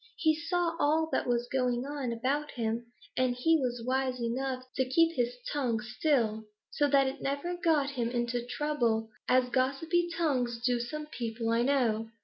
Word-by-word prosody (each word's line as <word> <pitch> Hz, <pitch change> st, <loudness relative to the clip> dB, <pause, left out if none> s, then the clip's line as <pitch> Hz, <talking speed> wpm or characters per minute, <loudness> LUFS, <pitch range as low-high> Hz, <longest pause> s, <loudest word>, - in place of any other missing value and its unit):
He 315 Hz, -1 st, +3 dB
saw 335 Hz, +1 st, -1 dB
all 315 Hz, +2 st, +2 dB
that -, -, 0 dB
was 240 Hz, 0 st, +1 dB
going 250 Hz, -1 st, 0 dB
on 280 Hz, -4 st, -3 dB
about 270 Hz, +6 st, -1 dB
him, 230 Hz, 0 st, -2 dB, 0.3 s
and 255 Hz, -1 st, +1 dB
he 325 Hz, +7 st, +3 dB
was 245 Hz, -3 st, -2 dB
wise 260 Hz, 0 st, 0 dB
enough 255 Hz, +2 st, -2 dB
to 260 Hz, -, +2 dB
keep 330 Hz, +4 st, +3 dB
his 245 Hz, 0 st, 0 dB, 0.2 s
tongue 250 Hz, -6 st, 0 dB
still, 235 Hz, -2 st, 0 dB, 0.3 s
so 290 Hz, -, +2 dB
that 275 Hz, -1 st, +4 dB
it 265 Hz, +1 st, -3 dB
never 285 Hz, +6 st, -2 dB
got 315 Hz, -5 st, +2 dB
him 240 Hz, -4 st, -1 dB
into 240 Hz, 0 st, -1 dB
trouble 240 Hz, -5 st, 0 dB, 0.2 s
as 255 Hz, 0 st, +4 dB
gossipy 280 Hz, +7 st, +1 dB
tongues 250 Hz, -8 st, 0 dB
do 245 Hz, -1 st, +2 dB
some 300 Hz, +6 st, -4 dB
people 230 Hz, -5 st, -4 dB
I 230 Hz, +1 st, +3 dB
know." 235 Hz, -4 st, +1 dB
255 Hz, 170 wpm, -30 LUFS, 240-295 Hz, 0.3 s, that